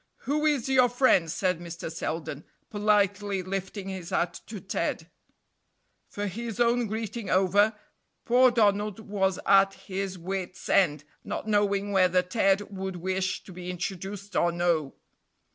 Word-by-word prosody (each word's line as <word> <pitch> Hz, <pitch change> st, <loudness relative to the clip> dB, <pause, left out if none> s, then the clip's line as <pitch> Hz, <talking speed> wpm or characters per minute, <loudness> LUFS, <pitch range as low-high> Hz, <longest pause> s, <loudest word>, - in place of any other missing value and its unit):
"Who 300 Hz, +2 st, 0 dB
is 285 Hz, -6 st, +1 dB
your 255 Hz, -2 st, +4 dB
friend?" 240 Hz, -9 st, +3 dB
said 180 Hz, 0 st, 0 dB
Mr. 170 Hz, -1 st, -7 dB
Selden, 160 Hz, -3 st, -4 dB, 0.3 s
politely 205 Hz, -2 st, +1 dB
lifting 195 Hz, +1 st, -4 dB
his 185 Hz, -3 st, -6 dB
hat 180 Hz, -2 st, -1 dB
to 215 Hz, -2 st, -7 dB
Ted; -, -, -3 dB, 1.0 s
for 205 Hz, -, -4 dB
his 225 Hz, +3 st, -5 dB
own 240 Hz, 0 st, +3 dB
greeting 220 Hz, 0 st, -4 dB
over, 200 Hz, +3 st, +3 dB, 0.5 s
poor 255 Hz, +2 st, +6 dB
Donald 210 Hz, -3 st, +1 dB
was 195 Hz, -3 st, -1 dB
at 195 Hz, 0 st, +5 dB
his 190 Hz, -1 st, -5 dB
wit's 185 Hz, +1 st, -5 dB
end, 150 Hz, -6 st, +3 dB, 0.2 s
not -, -, -5 dB
knowing 205 Hz, -1 st, +1 dB
whether 185 Hz, -2 st, +3 dB
Ted 195 Hz, +1 st, +2 dB
would 190 Hz, -1 st, -4 dB
wish 185 Hz, +1 st, -2 dB
to 190 Hz, -, -12 dB
be 180 Hz, 0 st, -7 dB
introduced 195 Hz, +3 st, -5 dB
or 170 Hz, -, +3 dB
no. 170 Hz, -4 st, 0 dB
195 Hz, 140 wpm, -27 LUFS, 180-210 Hz, 1.0 s, poor